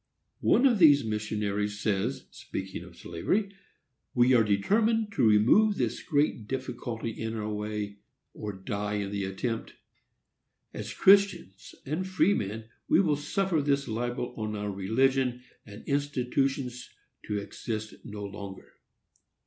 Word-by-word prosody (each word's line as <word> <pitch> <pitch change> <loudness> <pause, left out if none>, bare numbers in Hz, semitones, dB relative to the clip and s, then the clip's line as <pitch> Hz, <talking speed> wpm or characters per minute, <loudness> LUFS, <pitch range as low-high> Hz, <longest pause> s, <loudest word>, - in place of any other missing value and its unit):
One 255 - +4
of 240 -6 +4
these 145 -5 +7
missionaries 105 -1 -2
says, 105 +5 -1
speaking 95 -2 -6
of 90 -1 -14
slavery, 195 - -1 0.6
"We 125 +1 +5
are 120 -2 +6
determined 215 - +2
to 130 - +3
remove 120 - +5
this - - -1
great 145 - 0
difficulty 120 -3 -4
in 110 +1 -4
our 105 -1 -3
way, 105 -1 -4 0.4
or 105 - -5
die 100 +2 -3
in 100 -1 -2
the 100 -1 -2
attempt. 115 +4 -4 1.0
As - - -5
Christians 195 - +3
and 150 +5 -2
as 185 - -4
freemen, 115 - +1 0.2
we - - +5
will 165 -6 +3
suffer 165 +3 0
this 140 -1 +1
libel 120 +2 -3
on 110 -1 -3
our 105 0 -3
religion 125 +5 +1 0.2
and 105 +1 -11
institutions 135 -2 -1 0.4
to 105 - -1
exist 110 +1 -5
no 105 -1 -6
longer." 100 -1 -9
115 Hz, 135 wpm, -28 LUFS, 105-140 Hz, 1.0 s, these